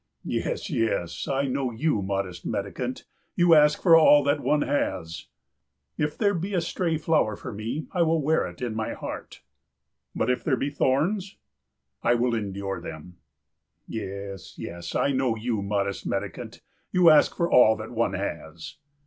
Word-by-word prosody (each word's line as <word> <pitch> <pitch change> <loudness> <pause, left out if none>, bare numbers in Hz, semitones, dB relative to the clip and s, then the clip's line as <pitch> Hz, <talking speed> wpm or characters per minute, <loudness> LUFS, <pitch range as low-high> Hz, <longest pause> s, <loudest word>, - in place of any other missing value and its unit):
"Yes, 485 -3 -2
yes, 110 - -1
I 140 +1 0
know 135 0 -1
you, 120 0 0
modest 95 -2 -3
mendicant, - - -4 0.3
you 175 -1 +5
ask 150 -1 +5
for 170 -3 +7
all 150 -2 +7
that 145 +1 +1
one 145 +3 +1
has." 85 - -2 0.7
"If 150 0 -2
there 205 -2 +2
be 190 +3 -3
a 175 - +2
stray 165 -1 -1
flower 155 -9 +1
for - - -8
me 115 +9 -4
I 180 - 0
will 165 -1 +3
wear 155 +2 +1
it - - -9
in 120 -3 -2
my 110 0 -3
heart." - - -8 0.7
"But 120 - +1
if 125 - -2
there 135 -5 +1
be 140 +3 -2
thorns?" 170 +9 0 0.6
"I 120 - +3
will 120 0 +1
endure 100 -3 -3
them." 80 +3 -9 0.7
"Yes, 100 -2 -7
yes, 85 0 -7
I 140 - +2
know 130 -3 +1
you, 110 -1 -2
modest 100 -1 -2
mendicant, 100 -2 -4 0.3
you 180 -3 +6
ask 150 - +5
for 170 0 0
all 110 -3 +6
that 110 0 -8
one 115 -4 0
has." 85 -4 -6
125 Hz, 165 wpm, -26 LUFS, 100-155 Hz, 0.7 s, for